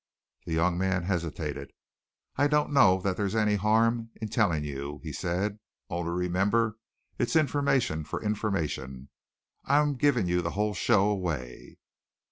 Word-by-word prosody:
The 85 - -2
young 85 +2 +1
man 95 -1 0
hesitated. 80 -6 -3 0.6
"I 145 - +3
don't 150 0 +1
know 95 -9 +5
that 95 -1 -1
there's 100 0 -1
any 105 -1 +2
harm 115 +3 +2
in 110 -1 -4
telling 95 -9 +1
you," 70 0 -5
he 80 -3 -6
said, 95 +6 -2 0.3
"only 85 -1 -2
remember 100 +6 0 0.4
its 120 - 0
information 140 - +1
for 75 - -5
information. 80 - -3 0.6
I'm 145 +1 +3
giving 125 -5 +2
you 90 0 +1
the 85 - -2
whole 105 0 +1
show 100 +1 +3
away." 85 -12 -4
95 Hz, 140 wpm, -28 LUFS, 85-115 Hz, 0.6 s, know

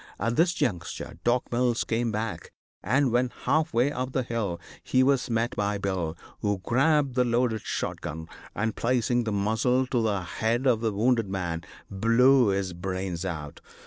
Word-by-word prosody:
At 115 0 0
this 170 +4 +3
juncture 90 - -3
Doc. 120 +1 +1
Mills 120 -1 +1
came 115 0 -1
back, 110 +1 -4 0.3
and, 130 +2 +2
when 125 +1 +2
half 155 +1 +2
way 125 +5 +2
up 130 -2 -4
the 130 - +1
hill, 110 -8 -2 0.2
he 130 - +2
was 135 -1 +2
met 115 +1 0
by 105 0 0
Bill, 90 -5 -2 0.2
who 105 -1 0
grabbed 140 +2 +2
the 125 0 +3
loaded 120 -2 +1
shot - - -3
gun, 80 +2 -6 0.3
and, 110 +1 -1
placing 120 0 +1
the 110 - -1
muzzle 110 +6 +1
to 125 -2 0
the 105 -4 0
head 115 +7 -1
of 120 -4 +3
the 115 -2 +1
wounded 115 0 +1
man, 85 -4 -2 0.3
blew 120 +5 +4
his 95 -2 0
brains 95 0 -4
out. 75 -5 -5
115 Hz, 175 wpm, -27 LUFS, 100-125 Hz, 0.3 s, blew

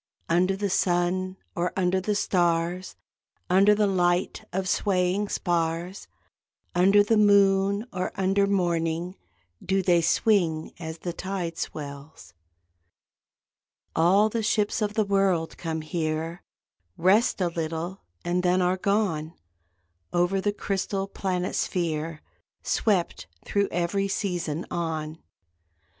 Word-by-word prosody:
Under 180 +3 +2
the 200 +1 -1
sun 185 +1 0 0.2
or 175 0 0
under 185 0 +1
the 210 +2 -1
stars 175 -1 0 0.6
(Under 200 +3 +6
the 210 0 +2
light 180 -2 +1
of 185 +1 -2
swaying 190 +1 +1
spars), 170 +1 -2 0.7
Under 195 +3 +5
the 220 +2 +2
moon 200 0 +4
or 185 0 -2
under 195 +1 +2
morning 175 -2 0 0.5
Do 195 0 +1
they 175 -2 +4
swing, 165 -4 +1
as 160 -1 -6
the 175 +1 -5
tide 180 -2 -4
swells. 140 - -7 1.6
All 190 +6 +4
the 225 +1 -2
ships 215 0 0
of 210 0 -1
the 215 - +2
world 195 -5 +1
come 160 -1 -3
here, 160 +1 -3 0.6
Rest 200 +8 +3
a 180 -2 +1
little 165 +3 -4 0.2
and 175 +1 +1
then 180 +1 +2
are 180 +1 +2
gone, 185 -6 0 0.8
Over 175 +2 +1
the 205 - +1
crystal 195 -1 -2
planet 185 -2 -2
sphere 165 -2 -2 0.4
Swept, 195 -6 0 0.2
thro 200 -1 +1
every 175 +3 0
season, 175 -5 -2
on. 160 -2 -3
180 Hz, 120 wpm, -26 LUFS, 170-195 Hz, 1.6 s, Under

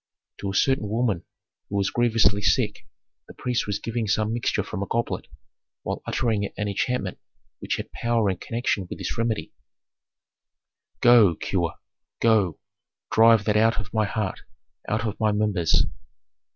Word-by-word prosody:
To 100 - -3
a 95 - -4
certain 130 -5 +2
woman 110 -5 0 0.4
who 100 - -4
was 100 0 +1
grievously 115 -3 +3
sick - - +1 0.4
the - - -13
priest 125 -3 -1
was 105 -1 -1
giving 115 +1 -3
some 110 +1 +1
mixture 120 - 0
from 95 - -5
a 100 - -2
goblet, 115 0 -2 0.6
while - - -3
uttering 110 -4 0
an 105 - -1
enchantment 125 +5 -2 0.4
which - - -2
had - - -6
power 115 -2 0
in 95 - -4
connection 115 -5 -2
with - - -6
this - - -4
remedy, 115 -2 -2 1.5
"Go, 115 -8 +6
cure, 85 -2 -2 0.4
go, 110 -7 +3 0.5
drive 115 -1 +6
that 105 -1 +2
out 115 +1 +3
of 105 0 -7
my 110 -1 +2
heart, 105 -1 -3 0.5
out 110 +1 0
of 105 -1 -3
my 110 -1 +2
members." 105 -6 +2
110 Hz, 150 wpm, -25 LUFS, 100-115 Hz, 1.5 s, Go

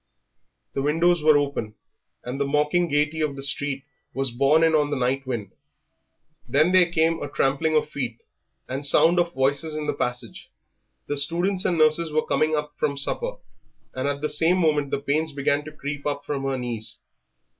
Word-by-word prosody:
The 135 - -2
windows 165 +4 +2
were 155 -1 +5
open, 140 -7 -2 0.5
and 125 +3 -5
the - - +2
mocking 150 +5 +1
gaiety 150 +1 0
of 150 -2 -1
the 135 - -6
street 140 0 0 0.3
was 135 -1 -1
borne 140 +6 +3
in 165 0 +3
on 150 -2 +2
the 145 - -2
night 130 +2 -1
wind. 110 -7 -4 1.0
Then 155 +5 +3
there 180 -2 +4
came 165 -1 +1
a 145 - -4
trampling 145 +3 0
of 155 - +2
feet 125 -6 -4 0.5
and 135 +3 -4
sound 165 +5 +4
of 170 0 0
voices 140 +4 0
in 155 -1 -3
the - - -1
passage 125 0 -4 0.6
the 145 - -2
students 175 +6 +1
and 180 -2 +1
nurses 155 +1 +3
were 155 +1 0
coming 155 0 +1
up 150 -1 -3
from 140 -2 0
supper; 485 - 0 0.6
and 130 +2 -2
at 145 0 -2
the 150 - -1
same 165 +4 +3
moment 150 -5 +1
the - - -1
pains 150 +2 -1
began 140 +1 0
to 155 - -8
creep 145 -1 -6
up 145 0 -3
from 140 -2 -3
her 135 -1 -1
knees. 120 -3 -5
145 Hz, 190 wpm, -24 LUFS, 140-160 Hz, 1.0 s, were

